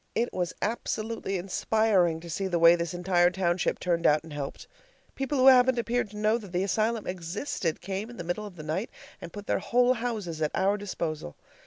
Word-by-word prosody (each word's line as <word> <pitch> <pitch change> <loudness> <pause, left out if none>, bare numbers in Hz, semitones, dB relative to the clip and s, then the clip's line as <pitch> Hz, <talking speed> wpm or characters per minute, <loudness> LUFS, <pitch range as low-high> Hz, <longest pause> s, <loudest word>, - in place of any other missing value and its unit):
It 235 +1 0
was 180 -1 -1
absolutely 220 -2 -2
inspiring 185 -2 +1
to 170 - -10
see 195 +4 -2
the 175 -2 0
way 170 0 +7
this 170 0 -3
entire 175 0 +3
township 180 -1 0
turned 170 -2 +1
out 150 0 +3
and 160 -2 -10
helped. 140 -2 -6 0.5
People 275 +2 -2
who 260 - +4
haven't 260 -1 +7
appeared 235 -1 0
to 210 - -10
know 215 +2 +2
that 200 -5 -11
the 180 +1 0
asylum 215 +2 0
existed 175 - -3
came 195 +4 -4
in 240 - -11
the 175 - -5
middle 175 +5 -3
of 195 - -12
the 155 - -9
night 165 +9 -2 0.3
and 170 - -8
put 205 -1 -8
their - - 0
whole 245 +1 +3
houses 215 -10 -4
at 155 - +2
our 195 +2 +2
disposal. 170 - -4
190 Hz, 205 wpm, -28 LUFS, 170-220 Hz, 0.5 s, way